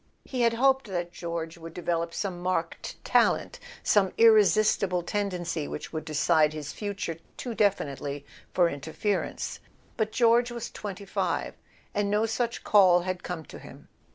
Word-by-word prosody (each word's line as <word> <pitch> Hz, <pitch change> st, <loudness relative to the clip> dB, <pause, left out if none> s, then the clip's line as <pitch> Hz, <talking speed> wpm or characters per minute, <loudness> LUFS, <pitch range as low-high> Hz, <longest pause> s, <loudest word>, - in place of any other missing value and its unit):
He 255 Hz, -2 st, -3 dB
had 230 Hz, -1 st, +4 dB
hoped 265 Hz, +1 st, +3 dB
that 175 Hz, -3 st, -3 dB
George 170 Hz, -1 st, -5 dB
would 165 Hz, 0 st, -10 dB
develop 170 Hz, -1 st, -1 dB
some 180 Hz, -1 st, -4 dB
marked 185 Hz, +1 st, -2 dB
talent, -, -, +2 dB, 0.2 s
some 195 Hz, -3 st, +3 dB
irresistible 215 Hz, -4 st, +4 dB
tendency 175 Hz, -6 st, -2 dB
which -, -, -7 dB
would 155 Hz, -1 st, -4 dB
decide 155 Hz, 0 st, +3 dB
his 150 Hz, -2 st, -6 dB
future 200 Hz, -6 st, -4 dB, 0.2 s
too 245 Hz, -, -4 dB
definitely 145 Hz, -9 st, -1 dB, 0.3 s
for 175 Hz, -2 st, +4 dB
interference; 160 Hz, +7 st, -3 dB, 0.4 s
but 220 Hz, -2 st, 0 dB
George 235 Hz, +1 st, +4 dB
was 240 Hz, -1 st, -6 dB
twenty 200 Hz, -1 st, -7 dB
five, 195 Hz, -, -1 dB, 0.4 s
and 205 Hz, 0 st, 0 dB
no 210 Hz, +2 st, +2 dB
such 235 Hz, +1 st, -2 dB
call 185 Hz, -4 st, +6 dB
had 185 Hz, 0 st, -3 dB
come 170 Hz, -4 st, -5 dB
to -, -, -11 dB
him. -, -, -13 dB
185 Hz, 150 wpm, -27 LUFS, 165-215 Hz, 0.4 s, call